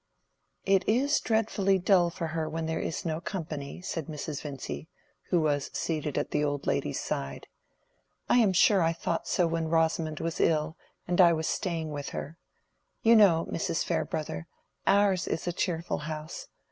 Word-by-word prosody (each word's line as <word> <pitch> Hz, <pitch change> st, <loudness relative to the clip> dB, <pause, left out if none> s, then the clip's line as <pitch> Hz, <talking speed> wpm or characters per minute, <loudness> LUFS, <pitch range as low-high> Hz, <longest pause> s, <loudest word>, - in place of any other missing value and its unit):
"It 195 Hz, -1 st, +4 dB
is 275 Hz, +7 st, +3 dB
dreadfully 215 Hz, -3 st, +1 dB
dull 180 Hz, -2 st, +4 dB
for 170 Hz, 0 st, -4 dB
her 160 Hz, -1 st, -2 dB
when 160 Hz, +1 st, -3 dB
there 160 Hz, 0 st, -2 dB
is 165 Hz, -, -3 dB
no 160 Hz, 0 st, -2 dB
company," 160 Hz, -5 st, -5 dB
said 165 Hz, -5 st, -4 dB
Mrs. 150 Hz, -1 st, -5 dB
Vincy, 145 Hz, +2 st, -6 dB, 0.4 s
who 175 Hz, -, +3 dB
was 145 Hz, -3 st, 0 dB
seated 155 Hz, -3 st, -2 dB
at -, -, -1 dB
the 150 Hz, -, +1 dB
old 145 Hz, -1 st, -1 dB
lady's -, -, 0 dB
side. 70 Hz, 0 st, -4 dB, 0.8 s
"I -, -, +4 dB
am 215 Hz, -5 st, +4 dB
sure 190 Hz, +2 st, +5 dB
I 165 Hz, 0 st, +2 dB
thought 165 Hz, 0 st, -3 dB
so 180 Hz, -, +2 dB
when 165 Hz, -1 st, -1 dB
Rosamond 160 Hz, -1 st, +1 dB
was 165 Hz, 0 st, -3 dB
ill, 155 Hz, 0 st, +2 dB, 0.3 s
and 180 Hz, +1 st, +4 dB
I 170 Hz, -2 st, +7 dB
was 160 Hz, 0 st, -1 dB
staying 165 Hz, -4 st, -2 dB
with 145 Hz, -1 st, -4 dB
her. 160 Hz, +4 st, -6 dB, 0.6 s
You 230 Hz, +1 st, +7 dB
know, 185 Hz, -7 st, +5 dB
Mrs. 165 Hz, -, -1 dB
Farebrother, 80 Hz, -, -2 dB, 0.4 s
ours 195 Hz, -2 st, +3 dB
is -, -, -2 dB
a 175 Hz, -, -1 dB
cheerful 170 Hz, -2 st, -1 dB
house. 155 Hz, 0 st, -6 dB
165 Hz, 170 wpm, -29 LUFS, 155-180 Hz, 0.8 s, I